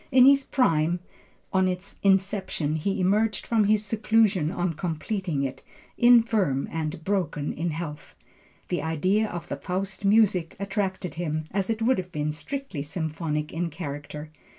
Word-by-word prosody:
In 255 0 +7
his 275 0 +6
prime 170 - +2 0.5
on 190 -1 +3
its 180 +1 -5
inception, 190 -5 +1
he 195 +6 -1
emerged 210 +4 +1
from 225 -3 +2
his 215 +1 +3
seclusion 215 -6 +2
on 175 -1 -1
completing 165 0 -2
it, 135 -1 -4 0.3
infirm 225 - +4
and 160 0 -3
broken 165 -6 -1
in 170 +3 -2
health. 155 -2 -6 0.5
The 175 - 0
idea 185 +8 +1
of 175 -3 -6
the 140 - -4
Faust 190 +6 -3
music 195 -5 +3
attracted 195 -4 -2
him, 155 -2 -2
as 195 +1 -1
it 225 0 -1
would 250 -2 +3
have 180 0 -6
been 150 -1 -1
strictly 165 - -5
symphonic 155 0 -3
in 170 +1 -1
character. 150 -1 -7
180 Hz, 150 wpm, -26 LUFS, 155-205 Hz, 0.5 s, In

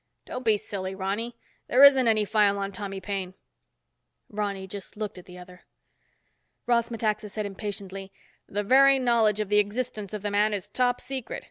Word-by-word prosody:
"Don't 255 - -6
be 220 -3 +3
silly, 190 -2 -5
Ronny. 205 +5 -3 0.3
There 260 +3 +5
isn't 270 -3 +8
any 215 -2 +3
file 205 -1 +3
on 200 0 -3
Tommy 195 0 -6
Paine." 190 -1 -5 1.0
Ronny 200 -2 -3
just 195 +1 -9
looked 210 -3 -5
at 180 - -16
the 180 0 -11
other. 180 0 -14 1.0
Ross 235 -1 +2
Metaxa 215 -2 -2
said 210 +1 -4
impatiently, 195 -1 -6 0.4
"The 205 +1 -2
very 270 +5 +6
knowledge 230 -5 +2
of 210 -2 -2
the 210 0 +4
existence 210 -1 -2
of 210 -2 -6
the 205 - -2
man 210 +1 +2
is 195 - -6
top 245 -1 0
secret. 265 -3 -5
210 Hz, 170 wpm, -26 LUFS, 195-230 Hz, 1.0 s, isn't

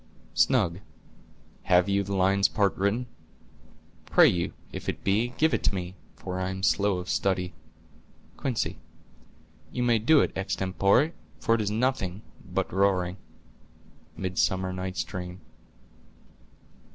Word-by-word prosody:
"Snug.—Have 90 -3 -1
you 100 0 +2
the 100 0 -3
lion's 95 +1 +3
part 100 0 +1
written? 100 +6 0 1.0
Pray - - +6
you, 85 -1 0 0.2
if - - -4
it - - -4
be, 110 +5 +1
give 160 +1 +3
it - - +1
to 100 - +2
me, 90 -1 -4 0.2
for 90 0 -5
I 95 0 -1
am 95 0 -5
slow 100 -1 +2
of 90 0 -6
study. 90 -2 0 0.8
Quince.—You 125 0 -6
may 120 -2 +3
do 145 +7 +5
it - - -1
extempore, 100 - +1 0.3
for 115 - +2
it 115 - +2
is 105 - -1
nothing 110 -4 -1 0.2
but - - -3
roaring." 95 -1 +1 1.0
—Midsummer 95 0 0
Night's 95 0 -3
Dream. 90 -1 -7
95 Hz, 125 wpm, -27 LUFS, 90-110 Hz, 1.0 s, Pray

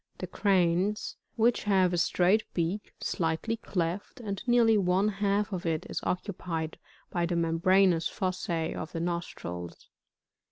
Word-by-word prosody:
The - - -4
Cranes, 190 +1 +1 0.2
which 235 0 +2
have 190 -3 +3
a - - +1
straight 185 +5 +3
beak, 175 +4 -1
slightly 170 +6 -1
clefl» 180 +4 -3
and 200 -1 -3
nearly 235 -2 +5
one 190 0 +2
half 200 0 0
of 180 - -3
it 160 -2 -1
is - - -1
occupied 175 -4 -3 0.3
by 170 -1 0
the 175 - -1
membranous 170 +1 +3
fossae 185 -4 -2
of 160 - -6
the 165 - -2
nostrils. 165 - -5
180 Hz, 135 wpm, -29 LUFS, 170-205 Hz, 0.3 s, nearly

